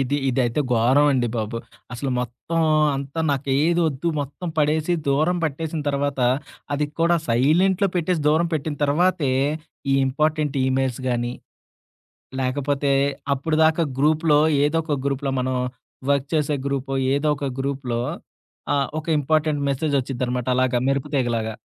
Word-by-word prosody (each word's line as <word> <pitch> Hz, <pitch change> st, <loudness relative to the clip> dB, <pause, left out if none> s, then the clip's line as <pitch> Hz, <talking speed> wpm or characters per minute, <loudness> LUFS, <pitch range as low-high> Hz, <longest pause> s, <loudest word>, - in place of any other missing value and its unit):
ఇది, 135 Hz, +2 st, 0 dB
ఇదైతే 125 Hz, +1 st, +1 dB
ఘోరం 130 Hz, +6 st, +4 dB
అండి 120 Hz, -3 st, +1 dB
బాబు. 110 Hz, +1 st, -3 dB, 0.4 s
అసలు 130 Hz, +2 st, -3 dB
మొత్తం 125 Hz, +7 st, -3 dB, 0.3 s
అంతా 140 Hz, +4 st, -4 dB
నాకేది 145 Hz, +5 st, +1 dB
వద్దు 150 Hz, +3 st, -2 dB
మొత్తం 145 Hz, +5 st, -5 dB
పడేసి, 155 Hz, +3 st, +2 dB
దూరం 155 Hz, +6 st, +2 dB
పట్టేసిన 155 Hz, +1 st, -3 dB
తర్వాత, 140 Hz, -1 st, -1 dB, 0.5 s
అది 145 Hz, +1 st, 0 dB
కూడా 170 Hz, +1 st, +4 dB
సైలెంట్‌లో 175 Hz, -, +3 dB
పెట్టేసి 175 Hz, -1 st, 0 dB
దూరం 165 Hz, +3 st, +2 dB
పెట్టిన 150 Hz, 0 st, -2 dB
తర్వాతే 150 Hz, -1 st, +2 dB, 0.6 s
ఈ -, -, +4 dB
ఇంపార్టెంట్ 150 Hz, +1 st, 0 dB
ఈ -, -, +1 dB
మెయిల్స్ 130 Hz, -1 st, -1 dB
గాని, 120 Hz, 0 st, -1 dB, 1.1 s
లేకపోతే 140 Hz, +2 st, 0 dB, 0.4 s
అప్పడుదాకా 160 Hz, +3 st, +2 dB
గ్రూప్‌లో 155 Hz, +1 st, +3 dB, 0.2 s
ఏదో 155 Hz, +3 st, +1 dB
ఒక 150 Hz, -3 st, -1 dB
గ్రూప్‌లో 140 Hz, 0 st, -1 dB
మనం 130 Hz, 0 st, -1 dB, 0.5 s
వర్క్ 140 Hz, 0 st, +1 dB
చేసే 150 Hz, -1 st, +1 dB
గ్రూపో, 135 Hz, -1 st, -2 dB, 0.2 s
ఏదో 145 Hz, +2 st, +1 dB
ఒక 140 Hz, -, -2 dB
గ్రూప్‌లో 135 Hz, -3 st, -2 dB, 0.7 s
ఆహ్, 140 Hz, -1 st, +1 dB
ఒక 155 Hz, -, -16 dB
ఇంపార్టెంట్ 155 Hz, 0 st, +1 dB
మెసేజ్ 145 Hz, +2 st, -1 dB
ఒచ్చిద్దనమాట, 125 Hz, -1 st, -3 dB
అలాగా 130 Hz, -1 st, +2 dB
మెరుపు 135 Hz, +1 st, 0 dB
తీగలాగా. 115 Hz, -4 st, 0 dB
140 Hz, 135 wpm, -23 LUFS, 130-155 Hz, 1.1 s, ఘోరం